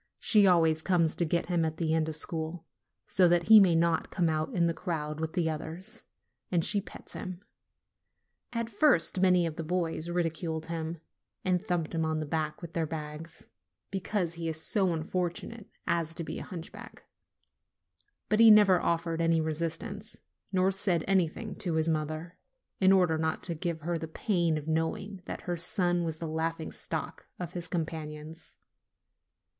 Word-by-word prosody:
She 210 -3 +5
always 165 -3 +4
comes 170 -3 +2
to 170 - +1
get 170 +2 0
him 175 -2 +1
at 160 0 -2
the 160 -2 0
end 160 -1 +1
of 155 - -1
school, 160 +1 -2 0.4
so 185 -2 +4
that 170 +2 +2
he 220 -1 +11
may 185 -4 +5
not 165 0 +2
come 170 -3 +1
out 155 0 -1
in 170 -2 +3
the 170 - +1
crowd 155 -4 -4
with 160 0 -3
the 170 -2 +1
others, 160 +6 -6 0.4
and 170 -3 +1
she 205 -2 +1
pets - - -12
him. 185 +1 -6 1.1
At 230 -1 -2
first 205 - +3
many 180 -2 +4
of 160 -2 -4
the 165 - -3
boys 170 -1 -1
ridiculed 165 -2 -2
him, 165 0 -4 0.5
and 180 0 +1
thumped 175 -6 -2
him 165 -1 0
on 160 0 0
the 155 - -3
back 155 +5 -3
with 170 0 -8
their 165 -2 0
bags, 155 +1 -7 0.4
because 190 -2 -1
he 165 -1 -4
is 160 -1 -1
so 190 +2 +1
unfortunate 180 +6 -3 0.2
as 165 -1 0
to 170 - -2
be - - -5
a - - -6
hunchback; 175 -4 -9 1.2
but 215 - +1
he 230 -1 +9
never 205 -4 +7
offered 165 0 0
any 165 0 +3
resistance, 170 +7 -3 0.3
nor 190 0 +3
said 185 -4 +1
anything 195 +3 0
to 175 -6 -2
his 160 0 +2
mother, 155 +2 -2 0.4
in 190 0 +5
order 180 -4 +4
not 160 0 -1
to 170 - -2
give 165 0 -3
her 170 +2 -2
the 160 - -5
pain 170 -2 0
of 150 0 -6
knowing 165 +5 -2
that - - -6
her 175 -1 -3
son 175 0 +1
was 160 -2 -3
the 165 - -5
laughing 160 +1 -2
stock - - -4
of 175 -2 -4
his 175 -1 -3
companions. 160 -1 -5
170 Hz, 175 wpm, -30 LUFS, 160-180 Hz, 1.2 s, he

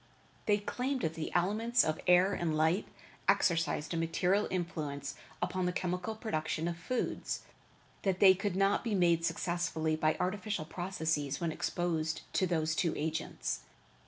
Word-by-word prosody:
They 205 -1 +5
claimed 255 +6 -2
that 160 -2 0
the 160 -1 -4
elements 215 +7 +3
of 155 0 -1
air 180 +2 +6
and 160 -3 0
light 160 +6 +2 0.4
exercised 165 -2 +2
a - - -1
material 180 +5 +1
influence 150 -6 -3 0.3
upon 180 0 0
the - - +1
chemical 180 +4 -2
production 160 -7 -2
of 170 - -2
foods, 235 +9 -2 0.6
that 190 -2 0
they 190 -2 +9
could 195 0 -2
not 195 +1 +3
be 225 -4 0
made 170 -3 +3
successfully 165 -2 0
by 155 0 +1
artificial 200 -2 -1
processes 160 -5 -2
when 170 -2 -1
exposed 160 -1 -1
to 185 - +2
those 160 -2 +1
two 165 0 +1
agents. 155 - -2
175 Hz, 150 wpm, -32 LUFS, 160-190 Hz, 0.6 s, they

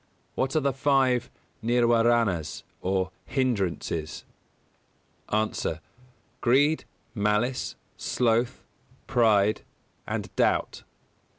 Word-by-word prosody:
What 135 +2 -1
are - - +5
the 140 -2 0
five 130 -3 +2 0.3
Nirwāranas 115 -6 +2 0.2
or 95 0 0 0.2
Hindrances? 95 - -1 1.0
A. 110 +1 -1 0.6
Greed, 145 +6 +3 0.3
Malice, 105 +4 0 0.2
Sloth, 120 +1 0 0.4
Pride, 110 -5 +3 0.5
and - - -4
Doubt. - - +1
120 Hz, 75 wpm, -27 LUFS, 105-130 Hz, 1.0 s, are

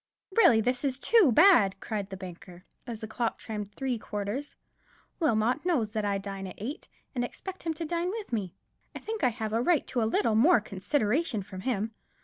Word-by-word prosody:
"Really 235 - +6
this 250 +4 +1
is 265 -2 +1
too 390 - +5
bad," 225 - +6
cried 205 -3 -4
the 190 - -6
banker, 180 0 -10 0.2
as 230 -2 -6
the 220 - -5
clock 230 +1 -2
chimed 210 -2 -5
the 205 - -35
three 260 -4 -2
quarters; 210 +8 -4 0.6
"Wilmot 245 -3 +1
knows 260 -12 0
that 215 -2 -1
I 200 -1 +1
dine 195 -1 -6
at 185 - -9
eight, 275 - -6 0.3
and 245 - -1
that - - -1
I - - -19
expect 380 -1 -8
him 325 -1 -2
to 330 - -4
dine 340 +2 -1
with 415 - -6
me. 195 -6 -2 0.4
I - - -5
think 440 -1 -5
I - - +5
have 220 -2 -4
a 225 - +2
right 325 +4 +2
to 245 - 0
a - - +2
little 225 0 +2
more 245 +8 +6
consideration 215 - -1
from 185 -1 -9
him. 225 -1 -1
230 Hz, 215 wpm, -29 LUFS, 205-290 Hz, 0.6 s, Really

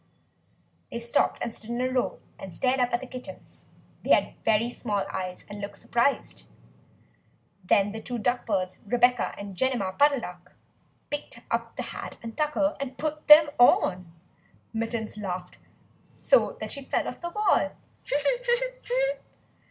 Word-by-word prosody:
They - - -3
stopped 235 0 +1
and 230 - -3
stood 225 - -10
in 240 0 -2
a 255 - +1
row, 255 -1 0 0.2
and 185 -3 -8
stared 260 0 +1
up 245 -1 +2
at 240 - 0
the - - -6
kittens. 255 0 -11 0.3
They - - -7
had - - -1
very 220 +1 +3
small 215 -4 -2
eyes 185 -1 -4
and 205 0 -8
looked 200 - -6
surprised. 235 +4 0 1.2
Then 200 +2 +3
the 220 +1 -6
two 245 +2 -4
duck 245 +2 0
birds, 185 -4 -1
Rebeccah 245 +2 +3
and 200 -1 -7
Jemima 240 -4 0
Puddle 285 +2 +4
Duck, 180 -2 -10 0.6
picked 290 - -5
up - - -1
the - - -3
hat - - -7
and 230 -1 -7
tucker 300 0 +1
and 265 -2 -5
put 305 0 -3
them 300 0 +9
on. 180 -7 +4 0.6
Mittens 225 -1 -3
laughed 180 -3 -5 0.5
so - - +2
that - - -5
she 280 -1 -7
fell - - 0
off - - -6
the 345 - -3
wall. 420 +4 +2
235 Hz, 150 wpm, -27 LUFS, 205-265 Hz, 1.2 s, them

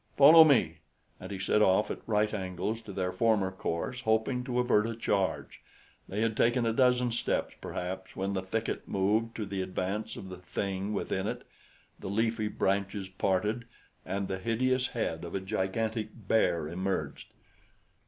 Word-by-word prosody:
Follow 155 +4 +10
me." 120 - +3 0.4
And 95 - -8
he 100 - -4
set 95 +3 +2
off 95 +1 +3
at - - -5
right 105 -1 +1
angles 95 +3 -3
to 110 - -9
their 95 -1 -2
former 100 -1 +2
course, 95 +7 -3
hoping 110 +3 +1
to 125 -2 -2
avert 115 -3 +3
a 115 - -4
charge. 100 -4 -1 0.5
They 100 +3 -2
had 115 -1 +1
taken 120 +1 +2
a 115 - +1
dozen 125 0 +3
steps, 115 - -1
perhaps, 95 +1 -5
when 95 +1 -2
the 95 - -1
thicket 110 +4 -3
moved 105 +4 +1
to 110 - -3
the 95 -1 -3
advance 95 +3 -3
of 95 - -8
the 90 -1 -8
thing 95 +2 -3
within - - -2
it, - - -4 0.6
the - - -6
leafy 110 +1 0
branches 100 -1 -1
parted, 105 +5 0 0.4
and 100 +1 -3
the 95 - -3
hideous 125 +5 +1
head 80 -10 -3
of 85 - -6
a - - 0
gigantic 110 +3 -2 0.2
bear 85 -8 +2
emerged. 95 +4 -3
105 Hz, 165 wpm, -30 LUFS, 95-115 Hz, 0.6 s, Follow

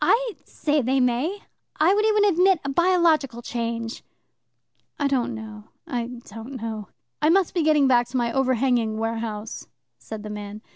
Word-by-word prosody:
I 485 -1 +3
say 295 -1 0
they 265 +2 +1
may. 260 +11 0 0.4
I 330 +5 +5
would 420 +1 +2
even 425 -1 +4
admit 375 -1 +4
a - - -1
biological 320 -6 +2
change." 230 -1 -4 0.9
"I 290 - -1
don't 250 -3 0
know, 215 -1 -9 0.2
I 245 -7 -3 0.2
don't 225 +5 -9
know." 220 -2 -5 0.3
"I 305 - +4
must 375 +1 +3
be 350 - +1
getting 305 -2 +4
back 240 -2 +4
to 255 +2 -3
my 235 -1 +1
overhanging 250 -4 +1
warehouse," 225 -1 -4 0.3
said 220 -1 -8
the 210 - -6
man. 210 0 -7
250 Hz, 160 wpm, -24 LUFS, 225-320 Hz, 0.9 s, I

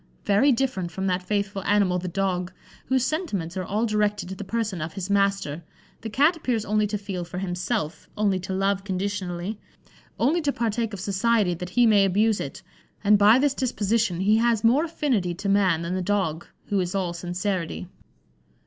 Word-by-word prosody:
Very 210 +8 +4
different 235 -8 0
from 190 +2 -4
that 185 -1 0
faithful 200 0 -2
animal 195 -3 +2
the 180 - -5
dog, 180 -1 -1 0.4
whose 260 -1 +2
sentiments 210 - -2
are 185 - -2
all 210 +5 -1
directed 210 -3 0
to 190 - -5
the 205 - -6
person 210 -4 -2
of 155 +1 -4
his 195 +1 -4
master, 195 -6 +1 0.4
the 225 - -5
Cat 290 +10 +3
appears 245 -9 -1
only 215 0 +1
to 210 +1 -2
feel 195 -3 -5
for 175 - -8
himself, 180 -2 -3
only 200 -3 +2
to 185 +1 -6
love 195 +1 0
conditionally, 195 0 -3 0.6
only 305 +9 +2
to 290 -2 +1
partake 230 -2 -1
of 200 - -5
society 200 0 +1
that 180 +1 -6
he 240 +6 +3
may 210 -3 +5
abuse 205 +3 +2
it; - - -6 0.4
and 205 0 +5
by 210 +4 +7
this 280 +1 +2
disposition 225 -7 0
he 210 +3 +4
has 230 -2 +2
more 260 +8 +4
affinity 255 - -1
to 195 +3 -5
man 190 -5 +3
than 170 +2 -3
the 185 - -1
dog, 180 -4 -1 0.2
who 200 - +1
is 180 +1 -2
all 185 -3 -1
sincerity." 175 0 -3
200 Hz, 185 wpm, -25 LUFS, 185-225 Hz, 0.6 s, by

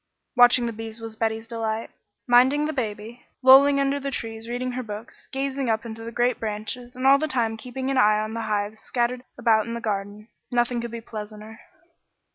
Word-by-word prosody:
Watching 245 0 +6
the 230 - -3
bees 225 +1 -7
was 225 -1 -7
Betty's 225 0 -2
delight. 225 -1 -3 0.3
Minding 260 +4 +5
the 310 - -2
baby, 225 -2 -5 0.2
lolling 275 +2 +8
under 275 +1 +1
the 280 0 -3
trees 225 -3 -6
reading 250 +1 -2
her 255 +1 -3
books, 215 0 -9
gazing 270 -1 -2
up 220 +1 0
into 225 0 -7
the 230 - -6
great 240 +1 +1
branches, 225 +3 -4
and 255 +1 -4
all 275 +1 +7
the 310 - -1
time 235 -5 0
keeping 260 +3 -4
an 265 - +2
eye 210 -2 +5
on 215 +1 -3
the 230 - -3
hives 210 0 -2
scattered 245 0 -1
about 225 -2 +3
in 230 - -4
the - - -3
garden, 205 -1 -4 0.2
nothing 240 0 +1
could 235 - -5
be 230 0 -7
pleasanter. 215 0 -9
235 Hz, 200 wpm, -24 LUFS, 220-255 Hz, 0.3 s, lolling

